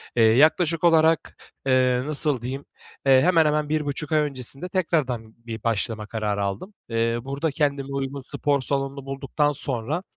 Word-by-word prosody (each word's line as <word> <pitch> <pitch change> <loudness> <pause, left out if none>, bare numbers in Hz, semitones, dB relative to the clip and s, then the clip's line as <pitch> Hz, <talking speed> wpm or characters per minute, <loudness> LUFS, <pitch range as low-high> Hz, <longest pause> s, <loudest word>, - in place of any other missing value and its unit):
eee, 115 - +4
yaklaşık 155 +8 +4
olarak, 165 -1 +3 0.3
eee, 130 -1 +3
nasıl 150 -3 +1
diyeyim? 135 +3 -5 0.4
Eee, 135 -1 +6
hemen 165 -1 +4
hemen 150 0 +1
1,5 150 -1 -2
ay 155 - +4
öncesinde 140 +3 -2
tekrardan 135 - -1
bir 115 -2 -7
başlama 110 -1 -1
kararı 105 -2 -2
aldım. 100 - -4 0.2
Eee, 115 0 0
burada 140 +4 -2
kendime 140 -1 -1
uygun 140 0 -3
spor 140 +2 -1
salonunu 135 0 -2
bulduktan 135 +2 -1
sonra, 140 +4 -2
140 Hz, 150 wpm, -24 LUFS, 125-150 Hz, 0.4 s, Eee